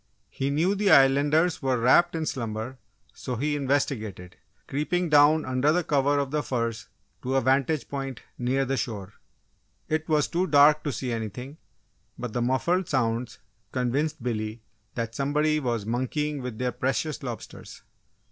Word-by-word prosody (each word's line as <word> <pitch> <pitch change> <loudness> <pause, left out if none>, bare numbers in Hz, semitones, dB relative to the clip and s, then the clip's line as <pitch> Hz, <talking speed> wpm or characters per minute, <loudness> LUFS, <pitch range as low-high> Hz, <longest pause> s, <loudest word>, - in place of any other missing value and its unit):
He 135 - -2
knew 160 +7 +2
the 205 0 +1
Islanders 145 +4 +4
were 130 -2 +1
wrapped 145 +9 +4
in 160 -1 -1
slumber 115 -1 -4 0.3
so 125 - -5
he 145 +5 -1
investigated, 120 -10 -2 0.3
creeping 170 +5 -1
down 150 +1 +5
under 145 +7 +2
cover 145 -1 +2
of 140 -1 -1
the 150 0 0
firs 115 -5 -3 0.3
to 130 +1 -2
a 135 - +3
vantage 135 +4 +1
point 135 -3 -5
near 130 +2 0
the 135 +1 -1
shore. 105 -6 -4 0.7
It 155 +1 -2
was 150 -2 +3
too 180 +2 0
dark 150 +1 +6
to 145 - 0
see 130 -1 -4
anything, 115 +6 -5 0.6
but 120 -3 -5
the 120 - -1
muffled 170 +9 +1
sounds 120 -4 -1 0.3
convinced 135 +3 -1
Billy 110 -2 -3 0.3
that 115 -1 -3
somebody 150 +3 +1
was 120 -6 -2
"monkeying" 135 +5 -2
with 125 -3 -6
their 125 +1 -1
precious 135 +4 -2
lobsters. 120 -4 -8
135 Hz, 150 wpm, -26 LUFS, 120-150 Hz, 0.7 s, dark